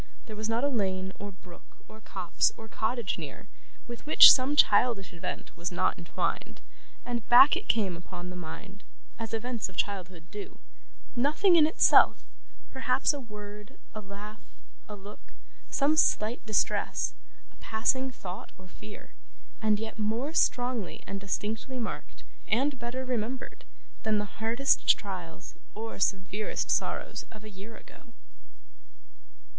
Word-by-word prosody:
There 220 - -9
was 215 +1 -3
not 230 +3 0
a - - +4
lane, 190 -7 -1
or 205 0 -6
brook, 185 -2 -17
or 215 0 -14
copse, 185 -4 0
or 220 - -10
cottage 220 -3 -2
near, 150 +5 -8 0.4
with 240 +4 -9
which 310 - +11
some 265 +2 +3
childish 205 -6 +4
event 170 - -6
was 170 +2 -4
not 185 +1 +1
entwined, 170 - -3 0.5
and 240 -2 -4
back 270 +6 +9
it 370 - -5
came 200 -6 +1
upon 175 +1 -8
the - - -8
mind 190 +4 -9 0.4
as 225 -1 -5
events 230 -1 -3
of 190 - -15
childhood 185 -4 -3
do 205 -1 -8 0.6
nothing 305 +9 +4
in 310 -2 +7
itself: 315 - +5 0.5
perhaps 265 +2 +2
a 290 - -5
word, 210 -3 -10 0.2
a 215 - -6
laugh, 205 +2 -10 0.5
a 210 - -6
look, 205 +1 -13 0.4
some 290 +2 +2
slight 230 -6 +2
distress, 215 - 0 0.4
a - - -24
passing 260 +4 0
thought 190 -7 -8
or 185 - -14
fear: 210 +3 -12 0.5
and 215 -2 +2
yet 220 0 -6
more 230 +8 -1
strongly 245 - 0
and 195 0 -5
distinctly 210 +6 -3
marked, 230 -3 -6 0.2
and 270 +4 +1
better 245 +2 -4
remembered, 250 +1 -4 0.4
than 220 -1 +1
the 205 - -1 0.2
hardest 235 +5 +2
trials 180 -4 -7 0.2
or 225 +1 -6
severest 195 +2 -1
sorrows - - -1
of 215 -1 -13
a 215 - -10
year 200 +4 -11
ago. 240 - -17
215 Hz, 145 wpm, -29 LUFS, 195-245 Hz, 0.6 s, which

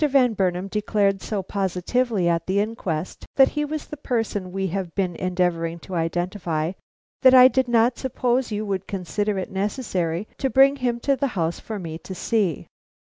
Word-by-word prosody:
Van 260 -4 +4
Burnam 185 -2 0
declared 200 -1 0
so 205 -3 -3
positively 195 +2 0
at 165 -1 0
the 190 +2 +1
inquest 190 -6 -3
that 270 -1 +6
he 295 - -2
was 300 +1 -4
the 300 - -8
person 225 -8 -2
we 195 +1 -2
have 185 -1 -3
been 185 -3 -1
endeavoring 175 -2 0
to 185 +2 -11
identify, 170 -1 -1 0.5
that 260 -1 +7
I 255 0 +10
did 260 -1 +1
not 240 +1 +3
suppose 250 -1 0
you 210 +1 -2
would 195 -2 -3
consider 200 +2 -2
it 190 - -4
necessary 190 -3 -2
to 270 - 0
bring 275 +2 +5
him 245 -2 -1
to 275 +2 +2
the 275 +1 0
house 165 0 0
for 220 - -6
me 165 -4 -6
to 190 - -8
see." 195 - 0
200 Hz, 180 wpm, -23 LUFS, 180-240 Hz, 0.5 s, I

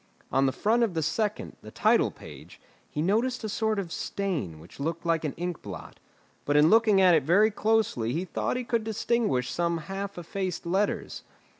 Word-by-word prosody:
On 135 +1 +3
the - - +2
front 225 - +1
of 220 -7 +1
the 160 - 0
second, 210 +7 -2
the - - -11
title - - +3
page, - - -13 0.3
he 150 - -2
noticed 235 +7 +1
a - - -2
sort 220 +1 0
of 185 -4 -3
stain 155 - -3
which 85 - -15
looked 165 +4 -3
like 165 -1 +1
an 150 - -2
ink 175 -1 -4
blot. 100 -3 -9 0.4
But 145 +1 +1
in 150 +2 +6
looking 220 -3 +5
at 185 -2 +6
it 160 - +5
very 195 +10 +4
closely 210 - +1
he 170 +8 -2
thought 185 - -2
he 250 - -3
could 235 -2 -1
distinguish 215 - 0
some 170 0 0
half 195 +5 -6
effaced 180 +1 -4
letters. 190 +4 -1
180 Hz, 190 wpm, -27 LUFS, 155-215 Hz, 0.4 s, in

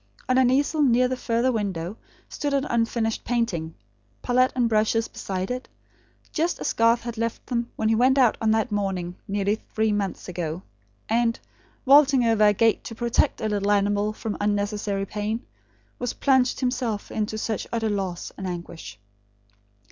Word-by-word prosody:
On 255 - +2
an 255 -1 +4
easel 285 +4 +2
near 250 -2 +4
the 255 - -2
further 240 +1 0
window 195 -5 -3 0.3
stood 285 -1 -2
an 275 0 +1
unfinished 230 -1 0
painting; 200 -10 -1 0.5
palette 255 +1 +3
and 245 -2 +2
brushes 225 +1 +2
beside 190 +2 -4
it, 255 +1 -5 0.6
just 335 +2 0
as - - -2
Garth 230 +1 +3
had 235 -1 -5
left 230 0 -3
them 235 -2 -2
when 220 - -1
he 225 - +3
went 255 +4 +4
out 250 -4 +5
on 220 - +2
that 220 +2 +1
morning, 190 -4 -2
nearly 200 0 0 0.2
three 220 0 +2
months 205 -2 -2
ago; 175 -1 -4 0.4
and, 230 +1 +1 0.5
vaulting 275 -2 +6
over 225 -2 +4
a - - +6
gate 225 +2 +2
to 225 - -7
protect 235 0 +1
a 220 - 0
little 205 -1 -1
animal 205 +1 +2
from 215 0 -5
unnecessary 205 -1 -1
pain, 210 +4 -3 0.5
was 245 -1 -2
plunged 260 -2 +2
himself 250 -4 -2
into 215 0 -2
such 220 -1 -3
utter 225 -1 0
loss 195 -4 -3
and 190 - -4
anguish. 170 - -7
220 Hz, 165 wpm, -25 LUFS, 205-245 Hz, 0.6 s, vaulting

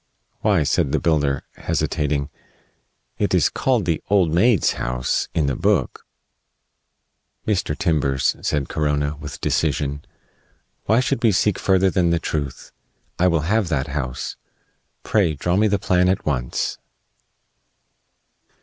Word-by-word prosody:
"Why," 100 -7 +2
said 70 -1 +1
the - - +2
builder, 75 -4 +1
hesitating, 70 -1 -1 0.9
"it - - +1
is - - +3
called 125 -7 0
the 85 -2 0
Old 95 -6 +3
Maid's 105 +4 +3
House 60 0 -1
in 80 -4 +2
the 70 -2 0
book." - - 0 1.4
"Mr. 95 -8 0
Timbers," 75 -8 +1
said 70 -2 -1
Corona, 75 -1 -1
with 75 - -8
decision, 70 -1 -1 0.8
"why 110 +4 +3
should 130 +1 -1
we 115 - +5
seek 105 +2 +1
further 95 0 +3
than 90 -2 +2
the 85 - +2
truth? 75 -4 -4 0.5
I 90 - +4
will 85 -3 +2
have 100 +5 +1
that 75 -3 -1
house. 65 -3 -4 0.7
Pray, 95 -8 +1
draw 90 +5 -1
me 105 +3 +3
the 100 -1 +1
plan 90 -1 +2
at 95 - -1
once." 65 -5 -2
80 Hz, 130 wpm, -21 LUFS, 70-95 Hz, 1.4 s, we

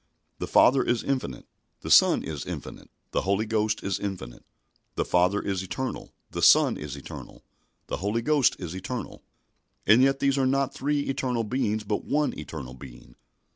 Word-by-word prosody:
The - - -3
Father 130 +1 +5
is 120 -1 0
infinite, 130 - -3 0.4
the - - -5
Son - - +6
is 75 -3 -5
infinite, - - -8 0.2
the - - 0
Holy 100 +3 0
Ghost 110 -1 0
is 100 0 -1
infinite. 90 -13 -6 0.5
The - - 0
Father 90 +3 +2
is 95 -3 -2
eternal, 130 +8 -5 0.2
the - - -4
Son - - +6
is 75 -2 -6
eternal, 70 - -10 0.4
the - - -4
Holy 105 +4 -1
Ghost 145 -1 +3
is 90 -1 -6
eternal. 115 +7 -6 0.6
And 110 +5 +6
yet 135 +1 +4
these 140 0 +2
are 130 - +2
not 135 0 +1
three 145 +1 -1
eternal 130 -4 -1
Beings 110 -2 -1
but 105 0 -2
one 150 +1 0
eternal 65 -6 -7
Being. 60 -2 -13
110 Hz, 170 wpm, -26 LUFS, 90-130 Hz, 0.6 s, Son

